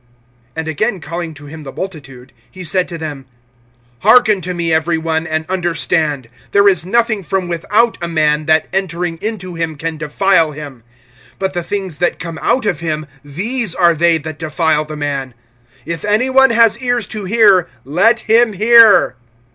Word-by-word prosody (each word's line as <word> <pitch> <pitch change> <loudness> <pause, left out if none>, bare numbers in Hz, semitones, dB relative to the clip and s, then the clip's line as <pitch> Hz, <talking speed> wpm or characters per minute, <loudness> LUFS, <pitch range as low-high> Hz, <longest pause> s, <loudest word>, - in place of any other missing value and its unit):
(14)And 160 - -3
again 195 +6 -1
calling 170 0 -6
to 145 0 -13
him 155 +2 -10
the 135 -3 -9
multitude, 140 -9 -8 0.2
he 185 +8 -10
said 185 +1 0
to 170 - -7
them: 145 -5 -7 0.7
Hearken 215 - +4
to 180 +2 -5
me 170 -1 -1
every 160 +1 +1
one, 160 0 -2
and 160 0 -2
understand. 165 -7 -1 0.2
(15)There 200 0 +5
is 175 -4 -1
nothing 230 0 +1
from 190 +1 -2
without 205 +7 0
a 170 - -3
man, 155 -2 0
that 160 0 +2
entering 175 -3 -2
into 200 -5 -4
him 165 -2 -3
can 160 +2 -5
defile 165 +1 +1
him; 145 -5 -9 0.6
but 190 -1 -2
the 175 - -2
things 185 -2 -5
that 175 - 0
come 165 -2 -7
out 255 - +1
of 195 -7 -1
him, 155 -2 -3 0.2
these 200 - -2
are 175 -2 +4
they 165 +1 +2
that 155 0 -8
defile 155 -1 0
the 155 0 -8
man. 140 -4 -4 0.5
(16)If 165 -1 -5
any 235 +5 +2
one 265 0 +6
has 230 -1 +3
ears 245 -3 -1
to 210 +1 -7
hear, 200 -4 +4 0.2
let 190 - +2
him 225 0 +3
hear. 220 - +6
170 Hz, 175 wpm, -16 LUFS, 155-200 Hz, 0.7 s, one